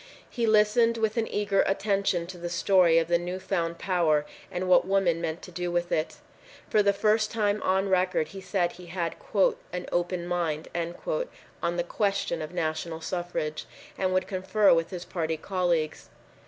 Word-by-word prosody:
He 235 -2 0
listened 220 +2 +4
with 220 -1 0
an 225 - +1
eager 200 -1 +1
attention 195 -3 +1
to 175 0 -9
the 175 0 -4
story 175 -1 +4
of 165 -1 +3
the 170 0 +3
new 180 +1 -4
found 170 -3 -2
power 165 -5 +1 0.3
and 180 +1 -2
what 185 0 +5
women 190 -4 +2
meant 160 -1 -3
to 180 - -10
do 175 0 -3
with 175 0 -1
it. 155 0 0 0.6
For 215 - +5
the 200 -1 +4
first 215 +2 +2
time 210 -2 0
on 190 +1 +1
record, 185 -4 +1
he 195 - -9
said 185 -2 0
he 180 -1 -12
had 170 -1 -3 0.6
"an 180 0 -4
open 175 0 -1
mind" 170 -3 -2 0.9
on 170 +1 -1
the 175 - +1
question 195 -3 -1
of 155 - -5
national 160 -1 -3
suffrage, 175 -3 -3 0.3
and 185 -1 0
would 185 0 +1
confer 190 +2 +3
with 165 0 +1
his 180 -2 -6
party 160 -2 -2
colleagues. 175 -4 -1
180 Hz, 175 wpm, -27 LUFS, 170-195 Hz, 0.9 s, what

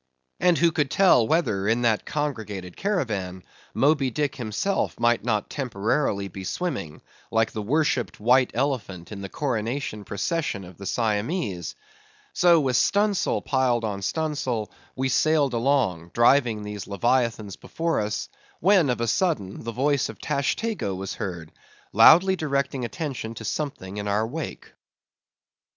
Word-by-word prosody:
And 180 -2 +4
who 170 0 +4
could 150 -4 0
tell 175 - +4
whether, 110 - +1
in 115 +3 +2
that 110 -3 +1
congregated 110 - -4
caravan, 105 - -2 0.3
Moby 140 -2 +3
Dick 140 +2 -2
himself 125 - -2
might 120 0 +2
not 110 -3 0
temporarily 110 -4 -1
be 95 +1 -8
swimming, 90 - -4 0.3
like 115 0 +1
the 110 - -4
worshipped 125 - 0
white 125 +4 +4
elephant 115 -10 -2
in 100 -2 -6
the 100 - -6
coronation 120 -4 -3
procession 105 - -2
of 90 -1 -12
the 100 - -7
Siamese! 105 - -1 0.6
So 175 -2 +5
with 130 -4 +1
stun 205 +1 +3
sail 195 - -1
piled 130 -4 +1
on 100 -3 -3
stun 155 +9 -1
sail, 120 -7 -3 0.2
we 130 0 0
sailed 145 -1 +2
along, 115 -9 +1
driving 120 -3 +3
these 105 -1 -6
leviathans 115 -1 0
before 165 0 -2
us; 105 0 -2 0.3
when, 185 -5 +4
of 120 -1 -1
a 115 - 0
sudden, 115 - -1
the 115 - -4
voice 135 +3 +1
of - - -8
Tashtego 140 - -1
was 95 +1 -5
heard, 85 -5 -6 0.4
loudly 170 - +7
directing 140 -5 -1
attention 120 -2 -4
to 115 - -8
something 105 -7 -4
in 105 0 -4
our 105 +2 +1
wake. 150 +7 -6
120 Hz, 145 wpm, -25 LUFS, 105-150 Hz, 0.6 s, loudly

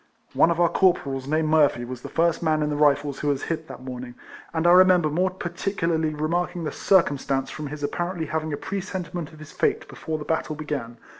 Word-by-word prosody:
One - - +4
of 170 0 0
our 175 - +5
corporals, 140 -9 +1
named 155 +1 +1
Murphy, 145 -6 +3
was 125 0 -7
the 140 - -8
first 165 +2 +1
man 155 -2 +1
in 150 - -1
the - - -1
Rifles 145 -1 +2
who 150 - -2
was 140 -1 0
hit 160 -1 -3
that 130 - -10
morning, 125 -1 -7 0.4
and 160 0 -1
I 175 - +7
remember 180 -3 +6
more 180 +5 +2
particularly 170 -3 -2
remarking 175 +3 -1
the 155 - -2
circumstance 140 -8 +1
from 155 -1 -6
his 145 +1 -7
ap 145 - -1
parently 175 -2 -3
having 160 0 -2
a 145 - -2
presentiment 180 -4 -5
of 155 - -14
his 155 0 -11
fate - - 0
before 160 -1 -5
the 150 - -7
battle 160 -1 -1
began. 145 -6 -5
155 Hz, 215 wpm, -24 LUFS, 145-175 Hz, 0.4 s, I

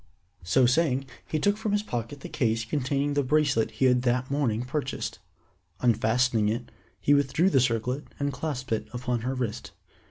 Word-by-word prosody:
So 105 +9 +3
saying, 135 0 +2 0.2
he 155 - -1
took 205 +6 +2
from 215 -2 -2
his 205 0 +1
pocket 120 - -5
the - - -6
case 115 -2 0
containing 140 0 0
the 145 - +2
bracelet 140 -4 +2
he 130 - 0
had 125 -1 +4
that 125 +1 0
morning 125 -6 0
purchased. 140 +3 -3 0.6
Unfastening 115 -1 +2
it, 120 +3 -3 0.3
he 145 - +3
withdrew 145 +6 +3
the 135 - +5
circlet 125 +3 0
and 140 0 -1
clasped 130 -2 -4
it 110 - -1
upon 125 -1 -1
her 130 +3 -2
wrist. 120 -5 -4
130 Hz, 170 wpm, -27 LUFS, 120-145 Hz, 0.6 s, the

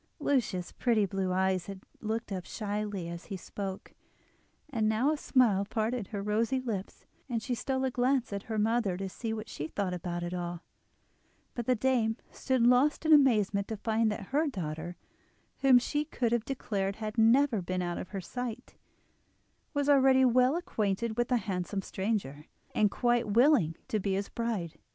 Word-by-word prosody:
Lucia's 240 - 0
pretty 225 -4 +2
blue 190 -1 -2
eyes 185 -1 +1
had 195 -1 -7 0.2
looked 220 0 -3
up 185 -2 -3
shyly 205 -4 -4
as 170 0 -7
he 195 - -5
spoke, 190 +1 -6 0.7
and 225 -7 0
now 235 +7 +2
a - - +1
smile 245 -9 +3
parted 220 +1 -2
her 200 -2 -4
rosy 225 +5 +1
lips; 220 -7 -5 0.2
and 230 -3 -2
she 255 - -2
stole 265 +2 -1
a 260 - 0
glance 250 -2 +1
at 200 - -3
her 220 - -1
mother 215 -3 +1
to 195 +1 -3
see 225 +4 -5
what 220 0 -4
she 150 - -5
thought 190 +1 -2
about 175 -1 -4
it 175 +1 -4
all; 175 -1 -4 0.9
but 240 -2 -5
the 255 - +4
dame 230 -2 +1
stood 260 -3 0
lost 255 +6 +4
in 315 - +6
amazement 210 -8 +4
to 220 - -4
find 220 +1 +1
that 200 -2 -6
her 305 +3 +3
daughter, 175 - -5 0.6
whom 265 -2 +6
she 295 +4 0
could 250 -6 -1
have 235 -2 +1
declared 200 -7 -2
had 215 -1 -5
never 230 0 +4
been 185 +1 -2
out 175 -1 -3
of - - -7
her 195 -2 -4
sight, 245 +4 -6 1.0
was 285 -2 -1
already 265 -2 +5
well 255 +3 +4
acquainted 220 - -1
with 240 0 +1
the 250 - +2
handsome 195 -1 -3
stranger, 190 -9 -3 0.3
and 210 -1 +3
quite 240 +2 +1
willing 225 - +4
to 215 - 0
be 195 0 -1
his 200 +1 -2
bride. 220 -9 -3
220 Hz, 180 wpm, -30 LUFS, 195-250 Hz, 1.0 s, in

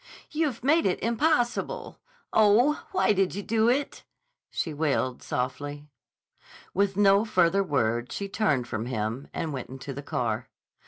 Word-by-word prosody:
"You've 300 -7 -1
made 315 +2 +4
it 180 - 0
impossible. 245 - 0 0.3
Oh, 220 +8 +4
why 370 - +3
did 190 -2 +1
you 200 - -4
do 225 +2 +2
it?" 275 +4 -1 0.5
she 160 - -3
wailed 140 -4 0
softly. 145 +4 -4 0.8
With 200 0 +1
no 200 0 +5
further 190 -3 +3
word 120 - 0
she 200 - -3
turned 150 - 0
from 115 0 -3
him 115 +2 -3
and 160 -3 -3
went 130 -3 -5
into 135 +1 -7
the 140 - -6
car. 120 -4 -2
185 Hz, 145 wpm, -27 LUFS, -, 0.8 s, no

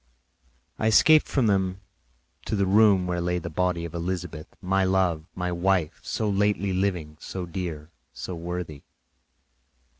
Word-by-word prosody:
I 110 - +1
escaped 155 +8 +6
from 135 -4 +1
them 95 -2 +1 0.7
to - - -1
the 100 -1 +2
room 100 -1 +5
where 90 -1 -1
lay 90 +1 0
the 85 -1 -5
body 90 0 0
of 85 - -8
Elizabeth, 85 -2 -4
my 95 0 +1
love, 95 -4 +1
my 90 0 -2
wife, 90 -2 0
so 110 - -2
lately 100 -1 +1
living, 90 -5 -1
so 90 +4 -5
dear, 85 -3 -5 0.2
so 95 - -6
worthy. 85 -3 -5
90 Hz, 145 wpm, -26 LUFS, 85-95 Hz, 0.7 s, escaped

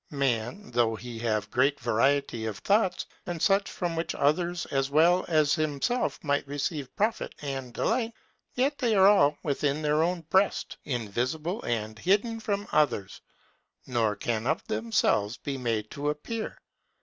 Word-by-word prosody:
Man, 135 - -2
though 115 -2 +2
he 120 0 -8
have 110 -3 -1
great 135 +3 +2
variety 120 0 +1
of 105 -2 -4
thoughts, 200 -2 +1 0.2
and 175 -1 -3
such 195 +3 +3
from 175 -2 -3
which 165 +1 -2
others 170 +4 +1
as 135 0 +1
well 170 +5 +4
as 155 -3 +3
himself 155 - 0
might 145 -2 0
receive 145 0 -3
profit 215 +2 -1
and 135 -3 -4
delight; 230 - 0 0.4
yet 275 +3 +1
they 235 -4 +2
are 190 -1 +6
all 195 -8 +5
within 145 -1 0
his 150 0 +2
own 170 +3 +1
breast, 190 +5 +1
invisible 130 - -2
and 110 -2 -3
hidden 210 - +1
from 205 -2 -2
others, 145 -10 +1 0.6
nor 115 -4 +1
can 115 +2 -2
of 155 +3 0
themselves 210 - +1
be 140 - -4
made 115 -4 -2
to 145 +1 -2
appear. 215 +10 -4
145 Hz, 150 wpm, -28 LUFS, 120-185 Hz, 0.6 s, are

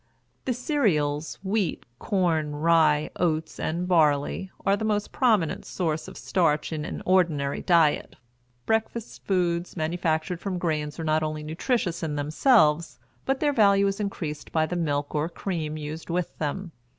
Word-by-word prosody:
The 255 - +1
cereals 160 - 0
wheat, 195 -3 -1
corn, 160 -6 0
rye, 155 -1 +3
oats, 160 -2 -1
and 175 +3 -2
barley 155 +1 +2 0.2
are 195 - +4
the 205 - -4
most 210 -1 0
prominent 215 - +2
source 160 -3 -2
of 190 - -10
starch 160 -4 +1
in 150 -1 -3
an - - -6
ordinary 165 -7 +2
diet. 165 -4 +3 0.5
Breakfast 225 +1 -2
foods 175 -2 0
manufactured 160 +1 -1
from 190 -1 -3
grain 155 -4 -1
are 165 - -4
not 155 0 +2
only 155 -1 -3
nutritious 175 - -1
in 155 -2 -2
themselves, 155 - +3 0.3
but 270 0 0
their 295 -2 +2
value 200 -4 +5
is 195 +1 -1
increased 160 -8 -4
by 160 -1 +2
the 180 - -4
milk 145 -4 -1
or 155 +2 0
cream 160 -5 -4
used 155 +2 -6
with 175 0 -2
them. 165 +4 -3
170 Hz, 150 wpm, -26 LUFS, 155-195 Hz, 0.5 s, value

